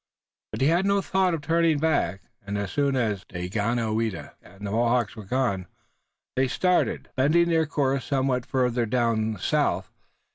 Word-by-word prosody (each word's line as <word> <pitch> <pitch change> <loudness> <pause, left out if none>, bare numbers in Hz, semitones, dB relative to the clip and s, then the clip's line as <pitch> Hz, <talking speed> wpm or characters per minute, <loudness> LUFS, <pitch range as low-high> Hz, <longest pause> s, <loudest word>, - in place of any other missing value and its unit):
But - - -5
he 135 - +4
had 175 +4 +2
no 200 0 +3
thought 190 -2 +1
of 160 - -6
turning 165 0 +2
back, 145 - 0 0.2
and, 100 0 -4
as 100 -2 -3
soon 140 -1 +1
as 110 -7 0
Daganoweda 110 -1 -2
and 100 +3 -12
the 100 - -3
Mohawks 120 0 +1
were 110 -3 -9
gone, 100 -6 -1 0.7
they 130 +1 +2
started, 180 +7 0
bending 155 +6 +3
their 160 -2 +2
course 140 -3 0
somewhat 130 -3 0
farther 125 -2 +1
toward 110 -2 +1
the - - -10
south. - - 0
125 Hz, 160 wpm, -25 LUFS, 110-150 Hz, 0.7 s, he